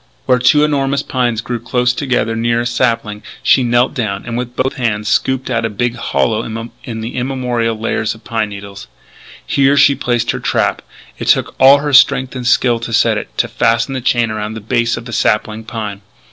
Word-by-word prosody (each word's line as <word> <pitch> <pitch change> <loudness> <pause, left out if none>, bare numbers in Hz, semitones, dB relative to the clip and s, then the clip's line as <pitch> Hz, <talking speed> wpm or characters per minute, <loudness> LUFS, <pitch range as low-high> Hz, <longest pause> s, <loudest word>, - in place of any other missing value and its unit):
Where 125 -1 +3
two 150 +5 +4
enormous 140 -2 0
pines 120 -3 -1
grew 120 0 -4
close 125 +2 0
together 125 -4 -1
near 115 +1 0
a - - -3
sapling, 115 -3 -1 0.2
she - - +4
knelt 120 +1 +2
down, 105 -5 -3
and, 115 -1 -4
with 125 0 -4
both 130 +1 0
hands, 105 -4 -1
scooped 130 +3 0
out 115 -1 0
a 115 - 0
big 120 +3 -1
hollow 110 -2 0 0.4
in 115 -5 -6
the 115 +2 -6
immemorial 125 -3 -1
layers 110 0 -2
of 110 - -18
pine 110 -2 -2
needles. 100 0 -9 0.6
Here 140 +1 +2
she 140 0 +6
placed 120 -3 -1
her - - -4
trap. - - 0 0.4
It - - -5
took - - +2
all 135 +2 +8
her 145 0 -3
strength 130 -1 +4
and 125 -2 -4
skill 120 -1 +3
to 115 0 -6
set - - +3
it; - - -9
to - - +1
fasten 115 +3 0
the 130 - -3
chain 120 -2 +1
around 110 0 -4
the - - -5
base 115 +2 0
of 115 - -8
the 120 - -8
sapling 110 +1 0
pine. 105 -3 -5
120 Hz, 200 wpm, -16 LUFS, 110-130 Hz, 0.6 s, all